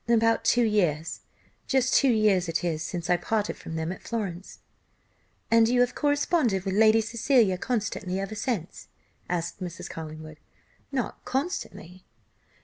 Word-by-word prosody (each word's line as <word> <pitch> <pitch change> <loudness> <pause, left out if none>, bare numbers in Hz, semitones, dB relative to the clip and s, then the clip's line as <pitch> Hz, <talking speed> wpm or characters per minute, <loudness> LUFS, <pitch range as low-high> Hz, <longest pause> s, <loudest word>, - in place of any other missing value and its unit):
"About 230 -1 +3
two 240 - +3
years; 165 -8 0 0.5
just 265 -1 +2
two 275 - +5
years 210 -6 +3
it 165 - -1
is 160 -3 -1
since 170 0 -4
I 180 - +3
parted 210 +2 -1
from 160 - -8
them 160 +1 -2
at 190 - -8
Florence." 195 -6 -5 0.9
"And 230 0 +5
you 245 0 +2
have 245 - +2
corresponded 290 - +1
with 190 - -1
Lady 220 +2 +5
Cecilia 225 -3 +2
constantly 200 -6 -2
ever 195 +2 -4
since?" 215 -5 -4 0.4
asked 175 +2 -3
Mrs. 175 -2 -6
Collingwood. 155 -1 -8 0.5
"Not 265 -3 -3
constantly." 255 - -4
205 Hz, 145 wpm, -27 LUFS, 175-235 Hz, 0.9 s, two